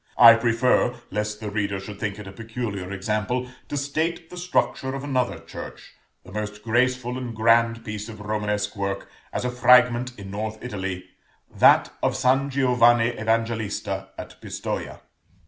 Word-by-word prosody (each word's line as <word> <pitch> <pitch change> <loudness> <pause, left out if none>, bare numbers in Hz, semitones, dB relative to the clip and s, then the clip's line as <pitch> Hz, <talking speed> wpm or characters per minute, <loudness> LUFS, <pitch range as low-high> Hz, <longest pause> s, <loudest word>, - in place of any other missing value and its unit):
I 115 -1 +10
prefer, 120 +1 +2 0.2
lest 105 +1 -2
the 105 -2 -5
reader 100 -2 -1
should 100 +1 -9
think 100 -1 -3
it 105 - -8
a 95 - -8
peculiar 110 -3 -5
example, 105 +5 -1 0.2
to 145 - -2
state 160 +4 -2
the - - -8
structure 175 -6 -1
of 135 - -5
another 125 -10 0
church, 80 0 -10 0.3
the 90 - -14
most 105 0 -5
graceful 125 +2 +1
and 120 -3 -5
grand 115 +1 +3
piece 105 +1 -5
of 110 -2 -9
Romanesque 105 0 -2
work, 100 -1 -3 0.2
as - - -3
a 125 - 0
fragment, 125 0 +4
in 100 -2 -8
north 110 +2 -4
Italy, 95 -6 -4 0.5
that - - +5
of - - +1
San 135 +2 +2
Giovanni 120 -3 +4
Evangelista 110 -4 -2
at - - -9
Pistoja. - - -5
115 Hz, 155 wpm, -24 LUFS, 105-125 Hz, 0.5 s, I